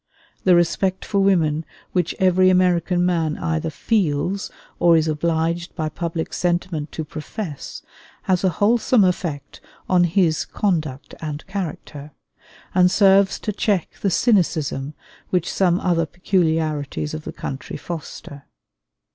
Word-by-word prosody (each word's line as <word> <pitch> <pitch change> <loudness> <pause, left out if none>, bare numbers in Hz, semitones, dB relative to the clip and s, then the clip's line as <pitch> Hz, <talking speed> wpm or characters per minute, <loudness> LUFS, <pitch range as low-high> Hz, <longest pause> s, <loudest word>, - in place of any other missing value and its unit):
The 185 -1 +6
respect 185 +2 +1
for 200 - 0
women 165 -6 +2 0.3
which 175 -2 0
every 185 0 +4
American 180 -1 +2
man 165 -4 0
either 160 0 -2
feels, 180 0 -1 0.3
or 170 -1 +5
is 160 0 +1
obliged 165 +2 -1
by 155 -3 -2
public 165 +1 -4
sentiment 175 -3 -1
to 160 - -4
profess, 155 +1 -7 0.4
has 185 -1 +1
a 190 - +4
wholesome 230 +1 +3
effect 165 -6 -2 0.3
on 180 -1 +4
his 170 -2 +2
conduct 155 -9 -2
and 150 -1 -5
character, 155 -6 -6 0.6
and 180 0 +5
serves 195 0 +4
to 215 - -2
check 195 -3 0
the 200 - +2
cynicism 155 - +1 0.3
which 180 -2 0
some 180 -2 +2
other 165 -3 +1
peculiarities 160 -5 -1
of 155 0 -5
the - - -6
country 135 - -6
foster. 145 -4 -8
170 Hz, 130 wpm, -21 LUFS, 155-185 Hz, 0.6 s, The